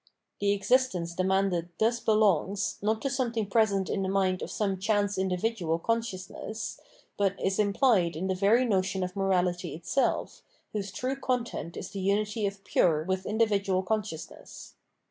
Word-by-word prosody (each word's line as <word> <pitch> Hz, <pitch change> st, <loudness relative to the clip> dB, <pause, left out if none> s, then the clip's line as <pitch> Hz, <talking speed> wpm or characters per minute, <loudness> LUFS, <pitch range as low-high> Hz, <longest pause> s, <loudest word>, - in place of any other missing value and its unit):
The 200 Hz, 0 st, +2 dB
existence 200 Hz, -5 st, +1 dB
demanded 185 Hz, -1 st, +1 dB
thus 235 Hz, +2 st, +2 dB
belongs, 205 Hz, -3 st, +2 dB
not 220 Hz, +2 st, 0 dB
to 275 Hz, -, +1 dB
something 235 Hz, -4 st, -1 dB
present 200 Hz, -2 st, +2 dB
in 195 Hz, -, -1 dB
the 190 Hz, -, -1 dB
mind 190 Hz, -1 st, +1 dB
of -, -, -4 dB
some 195 Hz, -3 st, -1 dB
chance 205 Hz, 0 st, +1 dB
individual 190 Hz, -2 st, 0 dB
con 230 Hz, +7 st, +1 dB
sciousness, 205 Hz, +1 st, -6 dB, 0.4 s
but 195 Hz, -1 st, +1 dB
is 195 Hz, +1 st, 0 dB
implied 200 Hz, -, +3 dB
in 170 Hz, +4 st, -3 dB
the 190 Hz, -, +1 dB
very 205 Hz, +7 st, +3 dB
notion 190 Hz, -3 st, 0 dB
of 180 Hz, 0 st, -4 dB
morality 180 Hz, -3 st, 0 dB
itself, 170 Hz, -, -1 dB, 0.3 s
whose 200 Hz, -2 st, -3 dB
true 260 Hz, +6 st, -2 dB
content 240 Hz, -, -2 dB
is -, -, -6 dB
the 200 Hz, -, -5 dB
unity 205 Hz, +2 st, 0 dB
of 195 Hz, 0 st, -7 dB
pure 155 Hz, -3 st, +2 dB
with 190 Hz, +2 st, -2 dB
individual 200 Hz, -3 st, +1 dB
consciousness. 190 Hz, -5 st, -5 dB
195 Hz, 155 wpm, -28 LUFS, 185-220 Hz, 0.4 s, implied